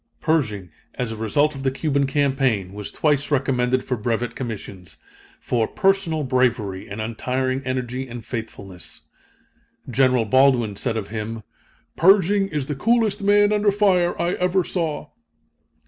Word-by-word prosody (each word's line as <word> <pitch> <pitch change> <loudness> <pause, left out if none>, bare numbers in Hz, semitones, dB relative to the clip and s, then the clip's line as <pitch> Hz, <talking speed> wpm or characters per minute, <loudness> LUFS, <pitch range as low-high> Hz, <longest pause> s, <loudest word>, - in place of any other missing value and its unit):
Pershing, 105 - -1 0.2
as 125 -2 -3
a - - -4
result 145 +8 +1
of 135 - -8
the 135 - +1
Cuban 140 0 0
campaign, 135 -9 0
was 105 0 -6
twice 145 -2 0
recommended 130 -3 +1
for 125 - -2
brevet 115 +1 -2
commissions, 100 - -7 0.4
for 115 -2 0
"personal 195 -6 +1
bravery 120 -7 0
and 100 - -6
untiring 130 +4 -2
energy 130 0 -3
and 120 -2 -8
faithfulness." 95 -9 -7 0.9
General 130 -1 +2
Baldwin 125 -2 +3
said 110 +3 -2
of 105 -3 -4
him: 110 +1 -5 0.5
"Pershing 195 +2 +4
is 150 -7 -3
the 150 - -3
coolest 220 - +1
man 205 +1 +4
under 210 -1 +3
fire 190 -4 +2
I 175 - +1
ever 180 +1 +1
saw." 160 -4 -3
130 Hz, 140 wpm, -22 LUFS, 115-160 Hz, 0.9 s, Pershing